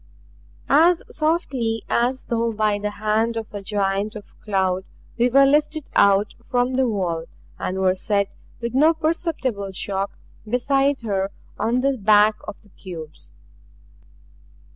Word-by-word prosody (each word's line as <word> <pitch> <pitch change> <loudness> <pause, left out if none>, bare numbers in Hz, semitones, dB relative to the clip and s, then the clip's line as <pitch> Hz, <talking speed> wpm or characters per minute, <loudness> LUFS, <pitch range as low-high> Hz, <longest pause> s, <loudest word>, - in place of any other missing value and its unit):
As 340 +2 +4
softly 270 -9 0
as 250 +2 0
though 230 0 0
by 215 -1 0
the 210 0 -2
hand 215 +2 0
of 225 - -3
a 205 - -5
giant 200 +1 -1
of 210 -2 -11
cloud 190 -2 0 0.3
we 240 +1 +2
were 275 +2 +6
lifted 300 +2 +1
out 200 +1 +4
from 245 +1 0
the 260 0 +2
wall, 175 -6 -2 0.3
and 185 - -3
were 190 -1 +3
set 200 +1 0 0.3
with 235 -1 -3
no 310 +5 +4
perceptible 310 - -2
shock 195 +1 -3 0.3
beside 270 +4 +1
her 195 -3 -1 0.3
on 245 +2 +1
the 270 -1 0
back 210 +1 +5
of 210 - -7
the 205 - -22
cubes. 160 - -10
220 Hz, 140 wpm, -22 LUFS, 200-260 Hz, 0.3 s, were